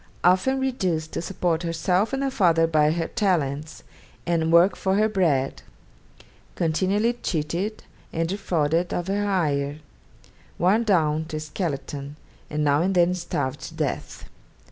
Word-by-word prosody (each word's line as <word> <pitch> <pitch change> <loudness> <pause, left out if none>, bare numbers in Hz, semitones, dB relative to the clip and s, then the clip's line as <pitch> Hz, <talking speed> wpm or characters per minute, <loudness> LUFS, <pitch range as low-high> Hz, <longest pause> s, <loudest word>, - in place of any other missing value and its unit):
Often 185 +10 +3
reduced 185 -12 -1
to - - -3
support 170 -2 -1
herself 180 +4 0
and 270 0 -1
her 270 - 0
father 170 -8 +3
by 155 -2 +3
her 165 +1 -1
talents, 155 - -1 0.4
and 165 -2 +1
work 175 +3 +5
for 190 0 0
her 215 +2 +3
bread; 160 -10 0 0.9
continually 190 +8 +1
cheated, 170 +7 -2 0.3
and 165 0 -1
defrauded 170 -3 0
of 175 - -3
her 205 +1 0
hire; 150 -8 0 0.8
worn 200 +7 +3
down 160 -6 +2
to 160 -1 -5
a - - -3
skeleton, 145 -3 -4 0.3
and 150 0 -1
now 145 +1 +3
and 190 +2 0
then 175 0 +4
starved 145 -6 -3
to - - -8
death. - - -3
170 Hz, 145 wpm, -24 LUFS, 155-190 Hz, 0.9 s, work